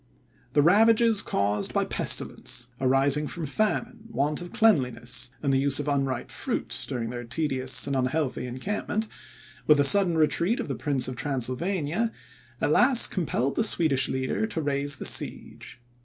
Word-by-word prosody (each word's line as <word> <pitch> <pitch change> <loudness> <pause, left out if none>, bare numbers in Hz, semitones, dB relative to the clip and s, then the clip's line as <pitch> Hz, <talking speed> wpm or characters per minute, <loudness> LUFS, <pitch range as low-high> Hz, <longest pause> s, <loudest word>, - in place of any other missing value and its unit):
The 145 - +3
ravages 220 +4 +4
caused 100 0 -2
by - - +1
pestilence, 120 0 -1
arising 135 +3 +1
from 165 +1 -6
famine, 215 - -2
want 150 -5 -2
of 175 - -9
cleanliness, 130 - +1
and 140 -2 0
the 135 - +2
use 140 0 +2
of 145 - -4
unripe 135 -2 -2
fruit, - - -4
during 115 -2 -4
their 120 0 -6
tedious 130 0 -1
and 140 0 -3
unhealthy 130 0 -2
encampment, 205 - -3 0.6
with 150 - +5
the 145 - +3
sudden 175 +2 +6
retreat 170 +8 +1
of - - -5
the - - -2
Prince 140 -4 0
of 130 -2 -7
Transylvania, 145 - -2 0.5
at - - 0
last 245 - +5
compelled 140 - -2
the - - 0
Swedish 150 -10 +2
leader 130 +11 -2
to 170 - -5
raise 140 -1 -1
the - - -8
siege. - - -1
145 Hz, 155 wpm, -25 LUFS, 130-185 Hz, 0.6 s, sudden